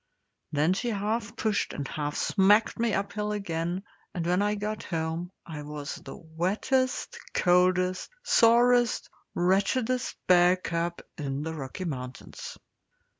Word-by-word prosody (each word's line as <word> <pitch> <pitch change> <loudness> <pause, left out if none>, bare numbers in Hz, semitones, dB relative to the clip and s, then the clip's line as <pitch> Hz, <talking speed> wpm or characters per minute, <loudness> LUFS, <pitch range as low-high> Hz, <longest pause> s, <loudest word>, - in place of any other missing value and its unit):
Then 155 +4 +3
she 240 +5 -2
half 215 +1 -2
pushed 215 -3 0
and 140 -2 -4
half 145 -1 -3
smacked 205 +3 +3
me 230 -2 +2
uphill 210 +1 -2
again, 175 -2 -2 0.3
and 170 -2 -2
when 180 +3 +2
I 210 +1 +1
got 210 +1 -3
home 165 +1 -3 0.2
I 155 -4 -6
was 145 -1 -5
the 135 - -10
wettest, 190 +11 -1 0.2
coldest, 180 +1 +3
sorest, 240 - +4 0.2
wretchedest 220 +8 +1
bear 180 0 +6
cub 170 -1 -3 0.2
in 140 0 -2
the 160 +1 -3
Rocky 150 +5 -5
Mountains. 130 -5 -6
185 Hz, 125 wpm, -28 LUFS, 160-210 Hz, 0.3 s, bear